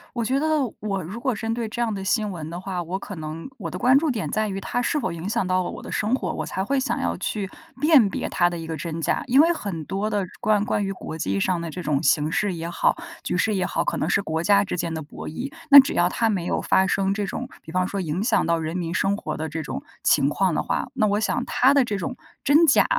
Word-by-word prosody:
我 235 - 0
觉 260 +4 +1
得 315 - 0 0.3
我 200 -2 -2
如 195 +8 -7
果 255 +1 0
针 225 +1 -2
对 235 -2 -2
这 235 +2 -4
样 230 - +1
的 195 -2 -4
新 210 +1 0
闻 160 -4 -6
的 170 +2 -6
话， 185 -2 -3
我 185 +3 -4
可 205 - -7
能 160 +6 -6
我 165 - -5
的 180 - -5
关 255 +5 +5
注 305 0 +2
点 225 -5 -3
在 215 0 0
于 195 -1 -4
它 245 - -2
是 270 +5 0
否 235 - -2
影 170 +2 -5
响 220 -2 0
到 185 0 +2
了 175 - -4
我 - - -8
的 - - -8
生 215 +3 0
活， 260 - 0
我 - - -4
才 190 - -3
会 275 +7 +1
想 265 - -1
要 - - -1
去 200 -3 -3 0.3
辨 295 -8 +6
别 - - -3
它 175 - +3
的 175 - -3
一 165 - -7
个 160 - -4
真 165 +2 -4
假。 - - 0
因 265 +4 +5
为 330 +2 +4
很 200 - -4
多 195 +2 -2
的 205 -2 0 0.2
关 210 -1 +2
关 205 -1 0
于 195 - -2
国 160 -3 -7
际 100 -8 -1
上 175 - +1
的 170 -1 -5
这 180 - -6
种 145 -3 0
形 150 +3 +3
势 205 +1 0
也 165 0 -5
好， 175 - +2 0.3
局 - - -2
势 210 +3 +1
也 185 -2 0
好， - - -1
可 - - -1
能 - - -1
是 185 +3 +2
国 160 -3 -2
家 200 +1 +5
之 190 - -4
间 170 -1 -2
的 160 - -3
博 145 - -9
弈。 245 - -5 0.2
那 280 - +13
只 270 - +4
要 175 - +3
它 225 +5 +1
没 190 -5 -1
有 - - -1
发 190 - +3
生 195 0 +1
这 205 +1 -1
种， 190 - -5
比 160 - -10
方 180 +1 +1
说 200 - -3
影 175 +1 -2
响 230 0 +2
到 170 0 +1
人 160 +2 -3
民 170 -2 -3
生 195 +3 +1
活 - - -4
的 160 +1 -4
这 160 +1 -4
种 - - -5 0.2
情 140 - +4
况 185 +3 +1
的 - - +1
话， - - -2
那 245 -5 +2
我 205 0 +1
想 220 - 0
它 265 +3 +4
的 280 -2 +5
这 215 -4 -2
种 195 +7 -4 0.3
真 305 +4 +5
假， 270 - +5
195 Hz, 310 characters per minute, -24 LUFS, 170-225 Hz, 0.3 s, 那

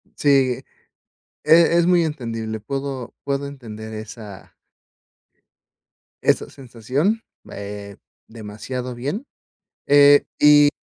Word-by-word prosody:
Sí, 145 - 0
eh, 130 -3 +2 0.8
e 170 +1 +5
es 170 - +3
muy 175 -2 +4
entendible. 115 -7 -4
Puedo 135 +1 -5
puedo 140 0 -2
entender 110 -6 -9
esa 110 -2 -10 1.7
esa - - +2
sensación, 135 - -2 0.3
eh, 100 0 -8 0.3
demasiado 115 +3 -6
bien, 145 - -4 0.6
eh, 145 0 +6
y 145 0 +7
130 Hz, 95 wpm, -21 LUFS, 110-145 Hz, 1.7 s, y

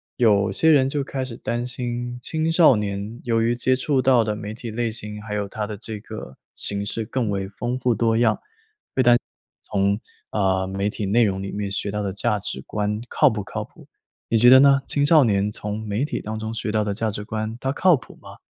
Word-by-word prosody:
有 105 -4 +3
些 160 - +3
人 135 -3 +4
就 145 0 -1
开 135 -1 -4
始 120 -3 -7
担 120 0 -3
心， 120 -1 -4
青 160 +5 -1
少 165 -6 +6
年 105 +2 -4
由 115 -1 +1
于 115 +1 +2
接 130 +2 +2
触 130 +1 +1
到 125 -2 +4
的 105 -1 -2
媒 105 0 -6
体 115 0 -7
类 115 +1 -1
型， 105 -1 -6
还 105 -1 -5
有 100 -1 -2
它 105 +1 -4
的 105 -1 -6
这 110 0 -6
个 105 -10 -9 0.2
形 100 0 -1
式 110 +2 -3
更 120 0 -2
为 100 -1 -2
丰 120 +5 -3
富 125 -1 +1
多 115 0 +1
样， 120 - +2 0.6
会 130 - +3
担 120 0 +6
心 - - +2 0.4
从， 100 0 0 0.3
呃， 95 -2 +1
媒 100 +1 -1
体 105 - -4
内 110 +5 +3
容 95 -2 -1
里 95 - -5
面 100 -1 -3
学 100 +1 -2
到 105 0 -2
的 100 -2 -2
价 105 +1 0
值 100 - -5
观 105 0 -2
靠 150 - +4
不 110 -4 -3
靠 - - -5
谱， - - -17 0.4
你 115 - +3
觉 120 +2 +7
得 130 +1 +9
呢？ 140 0 +6
青 145 -1 +1
少 155 -1 +6
年 100 -3 +2
从 105 0 -4
媒 105 +5 -1
体 150 - -2
当 110 +1 -5
中 110 0 -4
学 110 - -3
到 105 0 +1
的 105 -1 -2
价 110 +2 -1
值 105 0 -5
观， 110 +1 -4
它 135 - 0
靠 180 +5 +4
谱 130 - -11
吗？ - - -13
110 Hz, 255 characters per minute, -23 LUFS, 105-125 Hz, 0.6 s, 得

